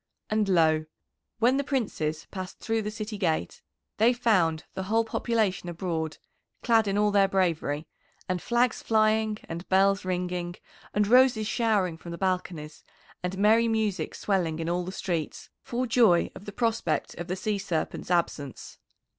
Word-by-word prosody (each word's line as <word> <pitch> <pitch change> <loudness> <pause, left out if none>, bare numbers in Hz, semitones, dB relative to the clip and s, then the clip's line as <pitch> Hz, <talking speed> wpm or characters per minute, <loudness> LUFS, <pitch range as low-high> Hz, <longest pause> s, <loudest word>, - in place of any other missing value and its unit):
And 215 -2 +1
lo! 160 -3 +3 0.5
when 240 +4 +3
the 280 - 0
Princes 180 - -2
passed 185 -1 -6
through 225 0 -1
the 210 - -3
city 215 -1 -6
gate 160 - -1 0.4
they 230 +3 +5
found 180 -10 +2
the 190 - -4
whole 225 +1 +3
population 220 -6 0
abroad 165 -3 -3 0.5
clad 225 -3 +4
in 200 0 0
all 210 0 +3
their 200 -1 +4
bravery, 165 -6 0 0.4
and 185 -1 -1
flags 240 0 +1
flying 215 -1 +2
and 170 +2 -7
bells 195 +1 +3
ringing 180 -1 -2 0.4
and 210 0 +3
roses 250 -2 +5
showering 210 -7 +1
from 170 - -10
the 170 - -5
balconies, 180 -5 -3 0.4
and 180 +1 -3
merry 220 +3 +4
music 215 -7 -1
swelling 180 -6 0
in 165 0 -3
all 175 +1 0
the 185 - -5
streets 175 -5 -4
for 250 +1 -2
joy 225 -7 +4
of 200 - -11
the 205 - -6
prospect 230 +1 -1
of 175 - -5
the 185 - -2
Sea 210 +1 -2
Serpent's 180 -5 -3
absence. 155 -6 -2
195 Hz, 160 wpm, -27 LUFS, 175-220 Hz, 0.5 s, they